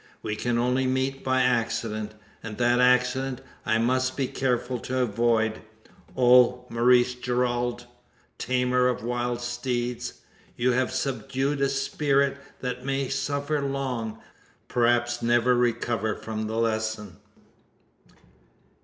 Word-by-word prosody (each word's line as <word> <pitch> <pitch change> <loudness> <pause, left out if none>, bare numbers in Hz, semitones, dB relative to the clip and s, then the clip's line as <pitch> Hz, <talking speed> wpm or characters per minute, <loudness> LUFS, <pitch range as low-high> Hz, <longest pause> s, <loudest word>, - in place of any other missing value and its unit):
We 105 - -2
can 120 +1 -1
only 125 +2 +1
meet 130 +1 -1
by 130 -1 +2
accident; 110 -3 -1 0.3
and 105 -2 -7
that 120 0 +3
accident 125 +1 +2 0.3
I 110 - +3
must 130 +3 +1
be 135 - +1
careful 125 -1 -1
to 130 +2 -4
avoid. 115 -2 +1 0.6
Oh, 125 0 +5
Maurice 120 +1 +4
Gerald! 120 -1 -1 0.5
tamer 125 0 +2
of 125 -4 -1
wild 120 0 -2
steeds! 120 0 -3 0.4
you 125 +1 +2
have 130 +1 +1
subdued 135 +2 -2
a 140 - +3
spirit 140 0 +1 0.2
that 125 -1 -4
may 135 0 -1
suffer 145 +2 -1
long 130 -5 -3 0.5
perhaps 120 0 +1
never 120 +1 +3
recover 115 -2 0
from 110 -1 -5
the 110 +1 -3
lesson!" 110 -3 -2
125 Hz, 120 wpm, -26 LUFS, 120-130 Hz, 0.6 s, Oh